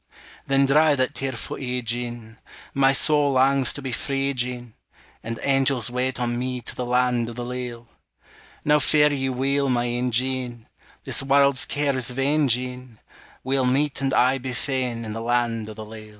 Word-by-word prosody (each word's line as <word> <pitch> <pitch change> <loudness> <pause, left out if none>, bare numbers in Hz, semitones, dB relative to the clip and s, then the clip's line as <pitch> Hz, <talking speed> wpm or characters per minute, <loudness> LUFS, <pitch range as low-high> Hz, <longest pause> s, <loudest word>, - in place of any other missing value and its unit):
Then 135 0 +3
dry 150 +2 +4
that 130 -1 0
tearfu' 130 -4 -5
ee, 125 -1 -3
Jean, 120 -1 -5 0.3
My 135 0 +4
soul 145 0 +2
langs 135 0 +4
to 140 - -7
be 135 - -3
free, 135 +3 -1
Jean, 125 -2 -4 0.5
And 115 0 -4
angels 135 -3 +2
wait 125 +1 -1
on 120 0 -1
me 125 0 -2
To - - -6
the 125 - -4
land 125 -1 +1
o' - - -7
the 120 +1 -5
leal! 120 -1 -6 0.8
Now 150 0 +4
fare 150 +1 +4
ye 135 -1 -1
weel, 135 +2 0
my 120 -1 +1
ain 120 +1 -1
Jean, 125 -1 -2 0.4
This - - -1
warld's 140 0 +3
care 145 -1 0
is 130 -1 -2
vain, 140 +4 +1
Jean; 125 -1 -3 0.5
We'll 130 0 +1
meet 140 +2 +1
and 135 -1 0
aye 130 +1 +3
be 130 0 -5
fain 125 -3 -2
In 110 - -5
the 115 - -5
land 115 -2 0
o' 110 - -8
the 110 0 -8
leal. 110 0 -11
125 Hz, 180 wpm, -24 LUFS, 120-135 Hz, 0.8 s, dry